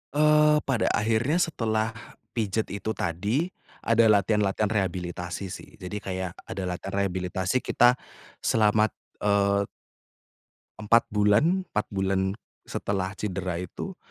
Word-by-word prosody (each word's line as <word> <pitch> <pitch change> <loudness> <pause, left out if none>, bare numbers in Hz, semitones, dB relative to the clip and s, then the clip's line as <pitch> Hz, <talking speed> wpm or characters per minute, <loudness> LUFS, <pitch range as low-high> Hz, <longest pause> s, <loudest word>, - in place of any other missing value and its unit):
Eee, 150 0 +5
pada 130 -4 +1
akhirnya 115 +7 +1
setelah 115 -10 0 0.4
pijet 110 -1 -1
itu 110 +2 -3
tadi, 105 - -1 0.3
ada 115 0 +4
latihan-latihan 105 0 +2
rehabilitasi 90 -2 -2
sih, - - -8
jadi 90 +3 -5
kayak 95 -2 -4 0.2
ada 95 - -4
latihan 90 +2 -4
rehabilitasi 95 +4 -1
kita 120 0 +4 0.4
selamat, 110 -1 +3 0.3
eee 100 -1 +2 1.1
4 110 +2 +3
bulan 105 - +3
4 105 - +1
bulan 95 0 0 0.3
setelah 95 -2 -2
cedera 90 -3 -3
itu, 90 - -6
105 Hz, 110 wpm, -26 LUFS, 95-115 Hz, 1.1 s, Eee